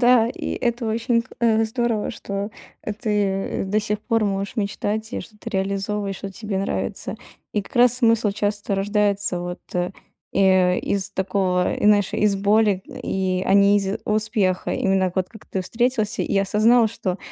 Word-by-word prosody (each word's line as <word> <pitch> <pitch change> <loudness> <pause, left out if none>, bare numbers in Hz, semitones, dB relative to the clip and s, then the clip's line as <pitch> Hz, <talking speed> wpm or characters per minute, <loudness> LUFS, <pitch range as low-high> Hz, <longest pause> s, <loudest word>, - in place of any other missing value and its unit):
Да, 240 -2 +5
и - - -4
это 235 -1 -1
очень 230 +2 +1
к - - -23
э, 225 -1 +3
здорово, 225 -1 -1
что, 200 +1 -5 0.3
э, 215 - -3
ты 205 -4 -1
до 200 +2 +1
сих 210 0 -2
пор 225 0 +1
можешь 195 +2 -2
мечтать, 215 +2 -2
и - - -2
что 215 - -13
ты 230 - -7
реализовываешь, 195 0 -2
вот, 195 - -5
тебе 210 -3 -3
нравится. 195 - -2 0.4
И 210 - +1
как - - -12
раз 245 0 +6
смысл 230 -3 +3
часто 205 0 -1
рождается 200 -1 +1
вот, 175 0 -5
э, 180 0 0 0.4
и - - +1 0.5
из 200 0 -1
такого, 190 -2 0
знаешь, 205 -2 +4
из 205 -2 +2
боли, 205 -1 +3
и, 185 -1 -2
а - - +2
не 200 0 +6
из 195 0 -1
успеха. 210 -3 0
Именно 190 -2 +1
вот 185 -1 0
как 220 - -14
ты 190 - -3
встретился 225 +2 0
и - - -1
осознал, 220 +4 +4
что, 185 -2 -3
205 Hz, 170 wpm, -22 LUFS, 195-220 Hz, 0.5 s, раз